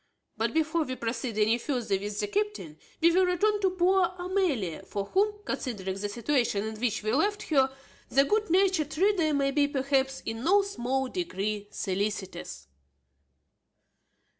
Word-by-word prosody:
But 225 +1 0
before 320 +1 +1
we 255 -3 -4
proceed 230 -1 -3
any 220 +2 +3
further 240 -8 -1
with 205 +1 -5
the 210 - 0
captain 410 - -3 0.2
we 335 +1 +6
will 370 +2 +4
return 410 +4 +1
to 385 - +3
poor 370 +1 +3
Amelia, 355 - -1
for 200 -1 -4
whom, 415 - 0
considering 195 -7 -3
the 205 +1 -3
situation 235 -2 0
in 220 -1 -6
which 225 -3 -1
we 215 +1 0
left 410 +9 +1
her, 270 -4 +3 0.4
the 275 - +4
good 425 +6 +1
natured 355 -4 +2
reader 365 -4 +3
may 275 -1 +1
be, 285 0 +3
perhaps, 270 -1 0
in 225 +1 -4
no 395 +5 +4
small 265 -8 -2
degree 215 - -3
solicitous. 195 - -4
270 Hz, 155 wpm, -28 LUFS, 215-360 Hz, 0.4 s, we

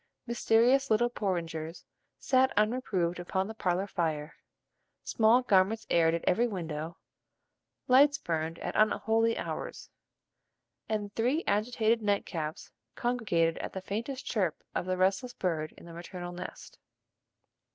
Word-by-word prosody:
Mysterious 240 +3 +3
little 240 +2 +3
porringers 165 -6 -3 0.3
sat 260 0 +3
unreproved 210 -6 +1
upon 190 +2 -1
the 220 - -6
parlor 185 -3 0
fire, 160 -5 -2 0.7
small 230 +3 +4
garments 200 +1 +3
aired 165 -1 +4
at 170 - -4
every 230 +7 +3
window, 165 -5 -5 0.9
lights 280 +3 +6
burned 165 - -3
at - - -5
unholy 225 +1 +2
hours, - - -5 1.0
and 205 -2 -2
three 255 +9 +1
agitated 220 +2 +1
nightcaps 180 -7 -2 0.2
congregated 185 -10 0
at - - -5
the 190 - -3
faintest 235 +8 -4
chirp 190 -9 -1
of 180 - -2
the 185 0 0
restless 195 +6 +1
bird 160 -4 -2
in - - -13
the 170 - -10
maternal 175 +1 -7
nest. 175 - -9
200 Hz, 125 wpm, -30 LUFS, 170-230 Hz, 1.0 s, lights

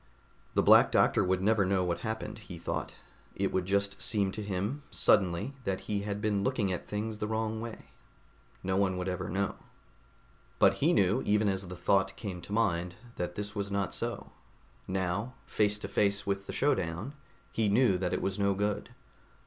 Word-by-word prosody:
The - - +4
Black - - +7
Doctor - - +4
would 95 0 +1
never 105 0 +4
know 95 0 +2
what 85 -1 -1
happened, 110 0 -4
he 95 -5 -9
thought. 85 - -4 0.4
It - - 0
would 95 -1 -1
just 100 0 0
seem 105 -5 +1
to 110 - -5
him, 100 +7 -2
suddenly, 90 +7 +2
that 95 -4 -2
he 105 -1 -2
had 100 0 -3
been 105 -2 +1
looking 115 -6 +1
at 90 - -5
things 105 +1 -3
the 105 - -2
wrong 110 0 -1
way. 115 -1 -7 0.8
No 95 0 0
one 95 -2 +2
would 90 +1 -3
ever 90 -1 -3
know. 100 +1 -1 1.0
But - - +6
he - - +4
knew, - - +3
even 105 0 +2
as 95 -1 -1
the 90 - -7
thought 95 +2 +2
came 95 -6 -6
to 85 - -10
mind, 90 -5 +1 0.2
that 90 0 -3
this 105 0 -4
was 100 -1 -2
not 100 -1 -1
so. - - -4 0.6
Now, 95 +6 -2
face 105 -1 +1
to 100 - -5
face 100 0 +1
with 100 0 -2
the - - -4
showdown, 95 - 0 0.4
he 110 -2 +1
knew 105 -3 +4
that 90 -1 -1
it - - -1
was 95 +1 -1
no 100 -1 +2
good. 105 +1 -1
100 Hz, 190 wpm, -30 LUFS, 95-105 Hz, 1.0 s, Black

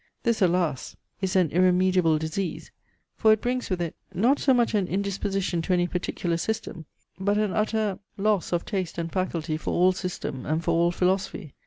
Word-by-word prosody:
This 230 -2 +1
alas! 170 -6 +1 0.3
is 190 -1 -1
an 180 -5 +3
irremediable 180 -2 +3
disease, 160 +4 -4 0.5
for 220 - +5
it 215 - +4
brings 250 +2 -2
with 185 -2 -1
it, 165 - -5 0.2
not 240 +10 +3
so 275 - +3
much 240 -3 +3
an 200 -4 +1
indisposition 195 -2 -1
to 180 - 0
any 175 -1 +3
particular 175 -1 -2
system, 180 -4 -4 0.3
but 200 +2 +1
an 210 -2 +1
utter 215 -2 0 0.2
loss 205 -2 +1
of 175 -1 0
taste 185 -5 -3
and 165 -1 -3
faculty 165 -4 -2
for 155 - -4
all 180 +1 +5
system 180 -8 -5
and 155 +3 -1
for 170 - +1
all 170 +1 +3
philosophy. 180 -3 -1
185 Hz, 180 wpm, -26 LUFS, 170-200 Hz, 0.5 s, for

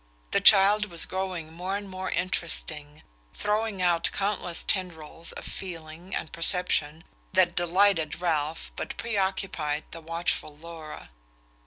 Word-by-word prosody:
The - - +3
child 205 +2 +7
was 170 -5 +2
growing 185 -4 -4
more 185 +4 -2
and 205 0 -7
more 185 0 -4
interesting 160 -4 -2 0.3
throwing 210 -2 0
out 170 -2 +3
countless 195 -4 -1
tendrils 165 -3 -1
of - - -8
feeling 170 0 -6
and 160 - -4
perception 165 -2 0 0.3
that 185 -2 +5
delighted 175 -2 +2
Ralph 160 -3 -1
but - - -5
preoccupied 190 -8 -1
the 165 - -8
watchful 165 -2 -2
Laura. 160 - -9
175 Hz, 125 wpm, -27 LUFS, 160-190 Hz, 0.3 s, child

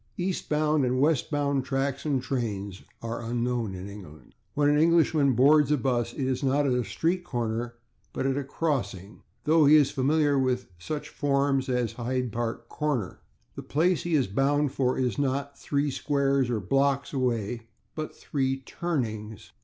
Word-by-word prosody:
/Eastbound/ 155 -5 0
and 130 0 +1
/westbound/ 145 -1 +1
tracks 135 +2 -2
and 135 -4 0
trains 100 -7 -3 0.2
are 115 0 -4
unknown 120 -3 -2
in 95 +1 -7
England. 80 -10 -12 0.2
When 145 0 +3
an 145 0 +4
Englishman 160 -4 +4
boards 145 +4 +5
a 150 - +4
bus 120 -2 0
it 135 - -2
is 130 -1 -1
not 140 +1 +2
at 135 - +2
a - - +1
/street 160 - -1
corner/, 120 -4 -3 0.4
but - - -3
at 135 -1 +1
a 140 - -1
/crossing/, 110 - -3 0.2
though 155 -1 +4
he 150 - +8
is 150 -3 +5
familiar 145 +1 +2
with 130 -4 -1
such 150 - -5
forms 140 -2 0
as 125 -3 0
Hyde 125 0 -2
Park 115 +1 -3
/Corner/. 140 - -2 0.4
The - - -6
place 170 +4 +1
he 175 -2 0
is 135 -4 +3
bound 140 +7 +1
for 130 -2 0
is 130 +2 -1
not 140 +1 -1
three 145 0 -1
/squares/ 140 -2 +1
or 115 -3 0
/blocks/ 135 +7 +1
away, 120 -3 -1 0.3
but 155 -1 -5
three 135 -2 -2
/turnings 110 - -4
135 Hz, 165 wpm, -27 LUFS, 120-145 Hz, 0.4 s, he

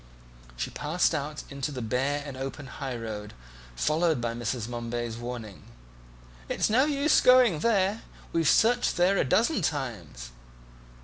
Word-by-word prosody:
She - - -3
passed 165 +4 0
out 150 0 -3
into 140 +2 -3
the 130 - -5
bare 135 +6 -1
and 140 -2 -7
open 135 +2 -6
high 135 -1 -5
road, 105 -2 -6 0.4
followed 155 - +1
by 120 -1 -2
Mrs. 120 -1 -3
Momeby's 120 -1 -4
warning, 120 -5 -7 0.9
"It's - - 0
no 255 +5 +4
use 295 0 +3
going 250 -10 +6
there, 205 +1 +1 0.3
we've 165 -3 +2
searched 235 -2 +3
there 180 +3 +3
a - - +4
dozen 230 - +2
times." 105 - -4
140 Hz, 140 wpm, -27 LUFS, 120-175 Hz, 0.9 s, going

